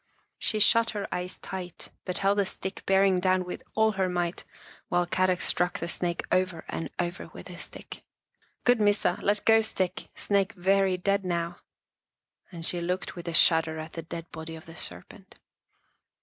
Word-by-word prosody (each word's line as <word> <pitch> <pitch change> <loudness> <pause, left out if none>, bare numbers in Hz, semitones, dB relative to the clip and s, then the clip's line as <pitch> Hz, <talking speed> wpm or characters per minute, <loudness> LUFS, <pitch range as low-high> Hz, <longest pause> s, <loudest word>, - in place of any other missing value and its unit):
She 215 - +1
shut 230 +2 +5
her 200 - -3
eyes 180 +1 -3
tight, 180 -2 -7
but 180 - -3
held 200 +1 +2
the 200 - +3
stick 190 +1 -6
bearing 195 -1 +4
down 185 0 +2
with 180 - -6
all 220 0 +4
her 190 -2 0
might 175 -1 -2 0.5
while 175 0 +2
Kadok 185 0 +1
struck 180 0 +1
the 170 - -4
snake 170 0 -1
over 185 -3 +1
and 165 - -3
over 175 +3 -3
with - - -10
his - - -6
stick. - - -7 0.3
" - - -39
Good 245 -2 +4
Missa, 205 -2 +2
let 205 +1 +1
go 225 0 +6
stick, 185 -4 -2
snake 200 +1 +1
very 190 0 +2
dead 200 +2 +1
now," 170 -1 -2 0.9
and 165 -2 -7
she 175 0 0
looked 180 +2 -2
with 175 -1 -8
a 170 - -2
shudder 160 -1 +5
at 155 +1 -7
the 165 - -4
dead 165 +1 -7
body 160 0 -7
of 160 - -11
the 165 - -12
serpent. 195 +2 -6
185 Hz, 180 wpm, -28 LUFS, 175-195 Hz, 0.9 s, go